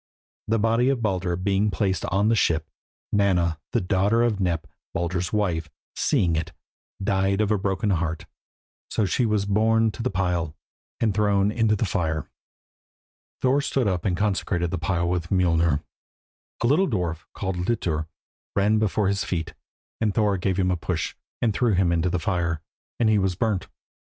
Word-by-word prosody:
The 115 - +2
body 115 +4 +2
of 130 -4 0
Baldur 95 -4 0
being 100 +3 +1
placed 95 -3 0
on 100 +3 +1
the 115 - +4
ship, 80 -6 +1 0.5
Nanna, 90 -6 +2
the - - +1
daughter 100 +5 +2
of 115 -4 +1
Nep, 85 -4 0 0.3
Baldur's 85 +1 -1
wife, 85 -7 0 0.3
seeing 85 -3 +2
it, 80 0 -3 0.5
died 95 0 +1
of 105 -1 +1
a 105 - +3
broken 100 +1 0
heart, 80 -3 -1 0.6
so 110 - +1
she 120 +5 +1
was 105 -2 +1
borne 110 +2 +3
to 110 - -7
the 125 - 0
pile 90 -5 -1 0.4
and 110 -3 +2
thrown 100 -1 +2
into 110 -1 +2
the 110 - 0
fire. 80 -4 -1 1.2
Thor 135 +2 +3
stood 135 -4 0
up 90 -3 0
and 90 -3 0
consecrated 95 -4 0
the 90 - -2
pile 85 -1 0
with 85 -1 -1
Mjolnir. 85 -5 +2 0.8
A - - +3
little 155 +10 +4
dwarf, 85 - -2
called 95 -2 -3
Litur, 90 -5 -1 0.5
ran 105 +2 +3
before 105 -1 +1
his 100 0 0
feet, 80 -3 -3 0.5
and 105 -3 0
Thor 105 -3 +3
gave 95 0 -1
him 90 -1 +2
a - - +2
push, 85 0 -2 0.3
and 115 -3 +2
threw 120 0 +2
him 90 -2 +3
into 85 +1 +1
the 90 - 0
fire, 85 -2 -1 0.4
and 115 - +3
he 110 -1 +4
was 95 -2 0
burnt. 105 0 -1
95 Hz, 170 wpm, -25 LUFS, 85-105 Hz, 1.2 s, the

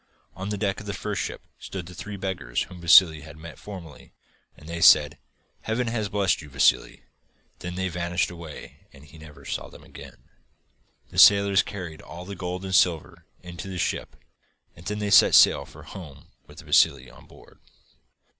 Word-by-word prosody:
On 95 +2 -6
the 105 - -3
deck 100 -1 -2
of 105 - -11
the 100 - -4
first 105 -1 -4
ship - - -6 0.2
stood 95 -3 -7
the 90 - -11
three 105 +3 -8
beggars 95 -11 -3
whom 90 -1 -12
Vassili 85 -2 +6
had 75 +1 -13
met 80 0 -11
formerly, 85 -10 -11 0.4
and 75 - -15
they 85 0 -6
said: 75 -3 +6 0.4
'Heaven 115 +3 -2
has 110 -3 -3
blessed 100 -4 0
you, 75 - -12
Vassili.' 70 0 +1 0.6
Then 90 0 -6
they 95 0 -2
vanished 90 0 -2
away 85 -4 -11
and 70 +1 -17
he 80 +2 -16
never 75 -3 -14
saw - - -5
them - - -15
again. - - -13 0.9
The - - -2
sailors 100 0 +6
carried 90 -8 -8
all 90 - -10
the 100 - -7
gold 90 0 -5
and 95 - -5
silver 90 -4 +1 0.2
into 90 +1 -9
the 95 -1 -6
ship, - - -3 0.6
and 85 +3 -13
then 105 - -3
they 105 -1 -3
set - - +6
sail - - +6
for - - -15
home 75 -8 -12 0.2
with - - -13
Vassili 65 -2 +2
on 65 - -17
board. - - -19
90 Hz, 185 wpm, -25 LUFS, 80-100 Hz, 0.9 s, Vassili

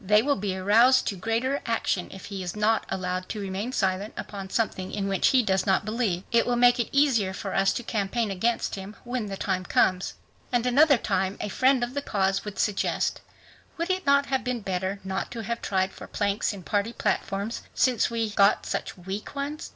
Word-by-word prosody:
They 210 +3 +4
will 285 +1 +2
be 195 -1 -2
aroused 230 +7 +5
to 200 - -4
greater 230 +8 -1
action 225 -5 -1
if 190 - -10
he 195 -2 -6
is 180 +1 -4
not 215 +1 +1
allowed 185 0 -3
to 215 - -4
remain 200 +4 -3
silent 195 -2 -1
upon 195 -2 -6
something 190 -4 -1
in 200 -1 -2
which 195 -1 +2
he 260 -3 +4
does 190 -2 +1
not 190 +1 +2
believe. 215 -5 -1
It 235 -1 +3
will 245 - +2
make 245 +1 +5
it 235 - 0
easier 250 -9 +3
for 195 0 -5
us 195 0 +3
to 240 - -4
campaign 220 0 -1
against 230 +5 0
him 195 +2 -7
when 245 -3 -3
the 195 -1 -5
time 185 -2 -1
comes." 185 0 +1 0.4
And 245 -1 +1
another 280 +3 +5
time 190 -3 -1
a - - -3
friend 260 +4 +3
of 240 +1 -3
the 285 - -2
cause 195 -6 0
would 210 -2 -7
suggest, 210 -2 0 0.6
"Would 335 +3 -1
it 370 -4 -2
not 280 0 +5
have 265 -2 -1
been 250 -2 -2
better 190 0 -2
not 190 0 -3
to 230 -2 -5
have 235 +2 -3
tried 190 -1 0
for - - -10
planks 200 0 0
in 200 -3 -9
party 205 +4 -1
platforms, 200 +1 -2
since 255 -4 +2
we 230 -2 -1
got 200 0 +4
such - - -3
weak 190 +7 -6
ones?" 285 +2 -4
210 Hz, 210 wpm, -26 LUFS, 190-240 Hz, 0.6 s, aroused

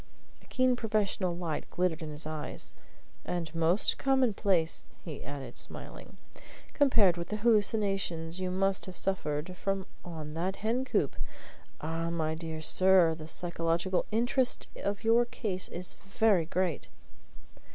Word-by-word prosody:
A - - -21
keen 255 -1 +2
professional 205 -6 0
light 165 -4 -3
glittered 180 -2 0
in 155 - -5
his 150 +1 -2
eyes. 155 -1 -5 0.5
"And 175 -3 -3
almost 165 +4 +2
commonplace," 210 -11 +2 0.2
he 155 -5 -6
added, 140 0 -5
smiling, - - -8 0.6
"compared 220 - +4
with 170 +1 -4
the 210 - -3
hallucinations 200 -6 +1
you 185 -1 -1
must 190 +1 +1
have 185 - -7
suffered 175 -2 -1
from 195 0 -2 0.2
on 155 -3 -7
that 180 +4 -1
hen 230 +6 -1
coop! - - 0 0.7
Ah, 165 +1 -2
my 160 -2 -1
dear 160 -1 -5
sir, 185 -1 +5
the 155 -1 -8
psychological 170 +2 0
interest 245 +3 +2
of 200 +2 -3
your 230 +2 +5
case 220 -6 -1
is 180 +1 -2
very 195 -3 +2
great!" 180 -2 -1
180 Hz, 135 wpm, -30 LUFS, 165-210 Hz, 0.7 s, sir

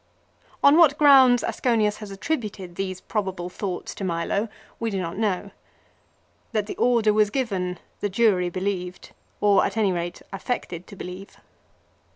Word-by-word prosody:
On 285 +2 +7
what 305 -4 +6
grounds 265 -4 +6
Aseonius 215 -4 +1
has 210 -2 -8
attributed 200 - -4
these 185 0 -4
probable 190 -4 -3
thoughts 180 -1 -5
to - - -7
Milo 185 +5 -1 0.3
we 230 - -1
do 195 -3 -2
not 170 -2 -4
know. 200 -2 -1 1.0
That 215 -2 0
the - - -6
order 230 -3 +3
was 210 -1 +3
given 195 -8 -2 0.2
the 205 - -1
jury 190 -4 +2
believed, 185 0 -4 0.3
or 205 -1 +5
at 200 - -2
any 210 -3 +3
rate 175 -1 -4
affected 185 -4 -4
to - - -11
believe. 185 +1 -9
200 Hz, 150 wpm, -24 LUFS, 185-225 Hz, 1.0 s, On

